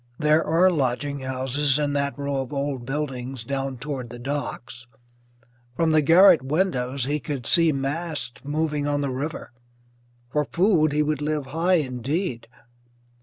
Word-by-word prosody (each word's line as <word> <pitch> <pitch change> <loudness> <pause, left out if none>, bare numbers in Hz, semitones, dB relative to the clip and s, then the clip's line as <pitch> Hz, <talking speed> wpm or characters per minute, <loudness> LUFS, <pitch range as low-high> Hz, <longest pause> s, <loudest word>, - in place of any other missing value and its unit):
There 155 +1 +3
are 175 +4 +4
lodging 140 -1 -1
houses 130 +2 0
in 145 -1 0
that 140 -2 -1
row 140 -1 -2
of 130 - -7
old 140 -3 -3
buildings 135 -3 -4
down 135 +1 -3
toward 130 -2 -5
the 120 - -8
docks; 125 -2 -5 0.9
from 165 +2 +2
the 155 -1 +4
garret 165 +1 +7
windows 135 -4 -1
he 145 +2 -1
could 140 -5 -5
see 165 +1 +5
masts 140 -2 -3
moving 150 0 -1
on 145 0 0
the 140 -2 -1
river. 140 +3 -5 0.8
For 150 +1 +1
food 170 -2 +2
he 150 +1 +2
would 150 -1 -1
live 150 -1 -1
high 165 +7 +1
indeed. 130 - -2
145 Hz, 150 wpm, -24 LUFS, 130-155 Hz, 0.9 s, garret